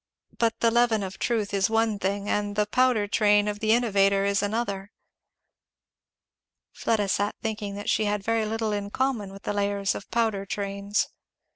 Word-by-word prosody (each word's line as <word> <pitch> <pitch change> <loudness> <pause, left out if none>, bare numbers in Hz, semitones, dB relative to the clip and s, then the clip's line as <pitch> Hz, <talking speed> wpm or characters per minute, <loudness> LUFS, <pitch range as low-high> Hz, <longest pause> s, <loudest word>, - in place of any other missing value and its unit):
But 230 -1 0
the 230 - +4
leaven 235 -3 +3
of 190 0 -7
truth 220 -4 -1
is 195 0 +2
one 225 -2 +1
thing, 200 +1 -2
and 205 -1 -1
the 210 0 +2
powder 240 -1 +2
train 205 0 +3
of 205 0 -3
the 220 0 +1
innovator 200 -4 +3
is 200 -1 +1
another." 205 -2 -2 1.8
Fleda 215 -3 0
sat 205 +2 0
thinking 210 -3 -3
that 205 - -7
she 215 - +2
had 205 -1 -1
very 225 0 0
little 220 0 -1
in 205 -1 -3
common 235 -5 -1
with 195 +1 -12
the - - -2
layers 200 -1 0
of 200 - -8
powder 220 -4 0
trains. 200 +1 -2
205 Hz, 170 wpm, -26 LUFS, 200-225 Hz, 1.8 s, the